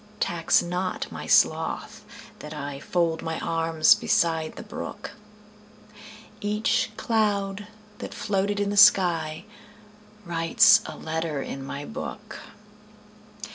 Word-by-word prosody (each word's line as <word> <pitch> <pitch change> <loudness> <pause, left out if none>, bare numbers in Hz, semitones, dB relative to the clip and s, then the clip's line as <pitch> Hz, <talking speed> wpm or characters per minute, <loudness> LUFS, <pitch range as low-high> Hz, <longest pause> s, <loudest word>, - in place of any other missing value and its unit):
Tax 165 -1 +2
not 180 +1 -3
my - - -7
sloth - - +1 0.4
that 150 0 -9
IFold 155 +3 -2
my 160 -1 -4
arms 165 -1 +3
beside 160 -2 0
the - - -8
brook; 210 - -7 1.3
Each 210 +2 0
cloud 205 -3 -1 0.3
that - - -7
floated 205 0 -1
in 205 0 -1
the 205 - -3 1.5
skyWrites 165 -1 +5
a - - -11
letter 160 -2 -3
in 135 - -7
my 140 +1 -6
book. 250 - -8
170 Hz, 100 wpm, -25 LUFS, 160-205 Hz, 1.5 s, skyWrites